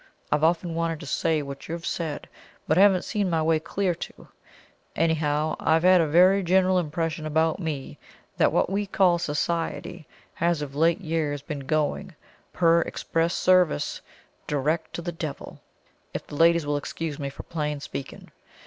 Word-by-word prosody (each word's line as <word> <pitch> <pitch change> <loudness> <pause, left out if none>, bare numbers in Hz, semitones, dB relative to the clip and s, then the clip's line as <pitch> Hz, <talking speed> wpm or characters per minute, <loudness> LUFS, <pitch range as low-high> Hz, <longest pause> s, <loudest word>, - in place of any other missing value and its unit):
I've 150 +1 +1
often 170 +1 +2
wanted 165 -1 -1
to - - -8
say 155 +2 0
what 140 0 -8
you've 170 +1 -5
said, 160 -4 -3 0.4
but 155 - +3
haven't 190 0 +5
seen 205 -4 -1
my 165 -2 +1
way 160 0 +2
clear 180 +3 -1
to - - -7
it. - - -16 0.7
Anyhow, 155 -1 +1
I've 160 +1 +2
had 185 -1 +6
a 160 - +1
very 185 +6 +5
general 185 +1 +3
impression 160 -1 -3
about 160 +2 +1
me 155 -6 -5 0.4
that - - +4
what - - +2
we 200 +2 -2
call 185 -3 +3
Society 165 +1 -3 0.3
has 170 -3 0
of 140 -2 -7
late 165 +5 +2
years 155 -4 -2
been 145 -3 -6
going, 155 +4 -1 0.4
per 170 -1 +4
express 165 +1 -1
service, 180 - +2 0.5
direct 155 +3 -1
to 170 - -5
the 175 - -3
devil 160 -4 -7 0.5
if - - -4
the - - -13
ladies 165 +1 +4
will 145 0 0
excuse 150 +1 -5
me 140 -1 -3
for 140 - -10
plain 150 -3 -3
speaking. 140 -1 -8
165 Hz, 165 wpm, -25 LUFS, 150-175 Hz, 0.7 s, had